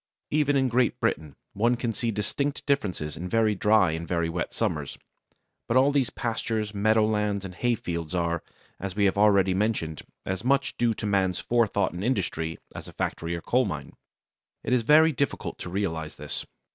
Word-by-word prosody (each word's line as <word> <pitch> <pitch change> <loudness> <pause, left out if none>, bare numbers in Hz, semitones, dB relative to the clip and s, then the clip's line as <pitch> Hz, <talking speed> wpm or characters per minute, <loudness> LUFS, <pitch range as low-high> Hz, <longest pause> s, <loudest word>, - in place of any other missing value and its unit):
Even 145 -1 +2
in 135 -1 +3
Great 125 -1 +1
Britain 75 -2 -1 0.2
one 120 +4 +2
can 120 -1 -2
see 115 +2 -1
distinct 115 +7 -2
differences 95 - -1
in 90 +2 -5
very 110 +1 +3
dry 105 -3 +4
and 80 +1 -4
very 85 -2 0
wet 85 0 -3
summers, - - -2 0.7
but 115 - +2
all 135 +2 +5
these 140 -3 +2
pastures, 110 -3 -2
meadowlands, 105 -1 +2
and 95 - -7
hay 120 +5 +1
fields 85 -4 -4
are, 85 -1 0 0.4
as 95 -1 -5
we 100 -1 +2
have 95 - +3
already 100 -2 +4
mentioned, 95 -6 -1 0.2
as 95 +1 -3
much 140 +2 +1
due 115 -2 +1
to - - -5
man's 95 -3 +1
forethought 115 -4 +1
and 90 +2 -5
industry 85 -9 -1 0.2
as - - -8
a - - -11
factory 85 +1 -2
or 85 - -5
coal - - +2
mine. - - -5 0.7
It - - 0
is 125 - +4
very 155 +6 +6
difficult 140 -1 -2
to - - -6
realize 80 -5 -2
this. - - -5
105 Hz, 185 wpm, -27 LUFS, 90-120 Hz, 0.7 s, very